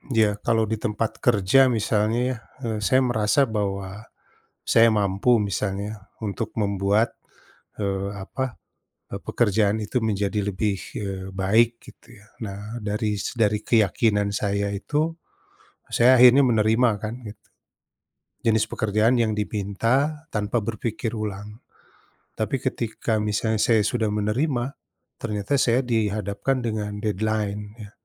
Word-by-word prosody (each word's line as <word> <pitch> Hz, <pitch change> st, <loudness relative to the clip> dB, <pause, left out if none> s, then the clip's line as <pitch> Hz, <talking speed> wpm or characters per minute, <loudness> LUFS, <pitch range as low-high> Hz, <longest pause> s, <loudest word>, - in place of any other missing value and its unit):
Iya. 105 Hz, -2 st, +3 dB
Kalau 115 Hz, -1 st, +3 dB
di 110 Hz, -, 0 dB
tempat 110 Hz, -1 st, -1 dB
kerja 110 Hz, +2 st, +4 dB, 0.2 s
misalnya 110 Hz, +2 st, +1 dB
ya, 125 Hz, -, -4 dB, 0.3 s
eh, 110 Hz, -2 st, -2 dB
saya 130 Hz, 0 st, +4 dB
merasa 110 Hz, +3 st, +2 dB, 0.2 s
bahwa 100 Hz, -2 st, -2 dB, 0.8 s
saya 115 Hz, 0 st, +7 dB
mampu 100 Hz, +4 st, +1 dB, 0.2 s
misalnya 100 Hz, +1 st, -2 dB
ya, -, -, -9 dB, 0.3 s
untuk 110 Hz, +2 st, -3 dB
membuat, 100 Hz, +2 st, +1 dB, 0.7 s
eee, 100 Hz, -1 st, -1 dB, 0.2 s
apa, 130 Hz, -, -3 dB, 0.7 s
eee, -, -, -4 dB
pekerjaan 105 Hz, -2 st, +2 dB
itu 125 Hz, -, -7 dB
menjadi 105 Hz, 0 st, 0 dB
lebih, 100 Hz, +1 st, -1 dB, 0.2 s
eee, 95 Hz, -2 st, -5 dB
baik 110 Hz, +5 st, +4 dB, 0.2 s
gitu -, -, -16 dB
ya. 105 Hz, -, -20 dB, 0.2 s
Nah, 100 Hz, -2 st, -6 dB, 0.3 s
dari 105 Hz, +1 st, -1 dB
s -, -, -3 dB
dari 105 Hz, -1 st, +3 dB
keyakinan 105 Hz, -1 st, +2 dB
saya 100 Hz, 0 st, 0 dB
itu, 150 Hz, +7 st, -1 dB, 0.9 s
a -, -, -30 dB
saya 120 Hz, +2 st, +6 dB
akhirnya 125 Hz, +3 st, +8 dB
menerima 115 Hz, +2 st, +3 dB
kan 110 Hz, +1 st, -3 dB
gitu, 105 Hz, 0 st, -13 dB, 1.0 s
jenis 110 Hz, -1 st, +3 dB
pekerjaan 110 Hz, +3 st, +2 dB
yang 110 Hz, -, 0 dB
dipinta 105 Hz, +3 st, 0 dB, 0.4 s
tanpa 105 Hz, +2 st, 0 dB
berpikir 115 Hz, +1 st, -3 dB
ulang, 105 Hz, +1 st, -6 dB, 0.8 s
tapi 110 Hz, +5 st, 0 dB
ketika 115 Hz, -3 st, -2 dB
misalnya 105 Hz, +1 st, 0 dB
saya 110 Hz, -3 st, +4 dB
sudah 110 Hz, -4 st, 0 dB
menerima, 120 Hz, +6 st, 0 dB, 0.6 s
ternyata 105 Hz, +1 st, -3 dB
saya 120 Hz, +2 st, +3 dB
dihadapkan 110 Hz, +2 st, -1 dB
dengan 105 Hz, -2 st, -3 dB
deadline 105 Hz, 0 st, -1 dB, 0.2 s
ya. 105 Hz, -3 st, -10 dB
105 Hz, 130 wpm, -24 LUFS, 100-115 Hz, 1.0 s, akhirnya